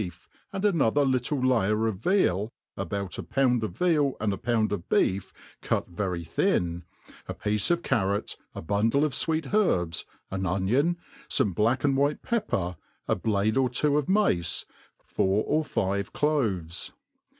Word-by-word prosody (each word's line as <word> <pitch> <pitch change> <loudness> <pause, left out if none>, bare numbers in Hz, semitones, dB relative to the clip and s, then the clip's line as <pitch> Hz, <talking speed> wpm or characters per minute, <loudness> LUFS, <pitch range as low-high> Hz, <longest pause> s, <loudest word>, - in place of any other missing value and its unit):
ef, 90 -2 -10 0.2
and 195 +1 -2
another 145 - +3
little 130 +2 0
layer 115 -4 +2
of 110 -4 -1
veal, 110 - +1 0.2
about 100 -2 -4
a - - -1
poui;d 125 -5 +1
pf - - -8
veal 155 -6 +2
and 105 -2 0
a - - -4
pound 115 -2 0
of 100 -5 -4
beef 95 0 +1 0.3
cut - - -1
very 90 -2 -3
fhin,' 85 +2 0 0.5
a'piece 105 -1 0
of 175 0 +1
carrot, 100 -1 0 0.2
a - - -6
bundle 110 - +2
of 150 - -2
fweet 160 0 0
herbs, 90 - +1 0.2
an 95 0 -2
onion, 120 - +1 0.3
iott\i 100 - +2
bjack 115 +8 +1
and 140 -2 +3
white 145 +2 +1
pepper, 105 - -1 0.3
a - - +2
jblade 110 +1 0
or 130 -1 +3 0.2
(wo - - +2
of 150 - 0
mafce, 190 - +2 0.4
four 95 +3 +1
oi 155 +1 +2
five 100 -8 -1
cloves. 100 - -1
110 Hz, 155 wpm, -27 LUFS, 95-145 Hz, 0.5 s, another